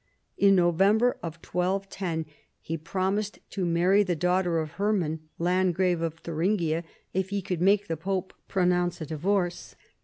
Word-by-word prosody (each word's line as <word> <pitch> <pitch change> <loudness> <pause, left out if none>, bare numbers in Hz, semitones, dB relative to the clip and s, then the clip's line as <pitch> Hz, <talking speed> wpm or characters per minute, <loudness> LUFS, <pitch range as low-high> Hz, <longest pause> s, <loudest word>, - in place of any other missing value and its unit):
In 200 -1 +5
November 195 +7 +3
1210 180 0 -2 0.3
he 165 - -4
promised 190 +6 -2
to 185 -3 -1
marry 180 +4 +4
the 185 -4 0
daughter 180 +1 +1
of 155 -2 -2
Hermann, 190 -6 0 0.2
landgrave 180 0 +1
of 165 -1 -2
Thuringia, 165 0 -1 0.3
if 190 0 -1
he 200 -1 -2
could 180 -2 -3
make 200 +2 +3
the 165 - -1
pope 185 +2 -3
pronounce 180 -2 +1
a 160 - -4
divorce. 175 +3 -1
180 Hz, 140 wpm, -27 LUFS, 165-195 Hz, 0.3 s, In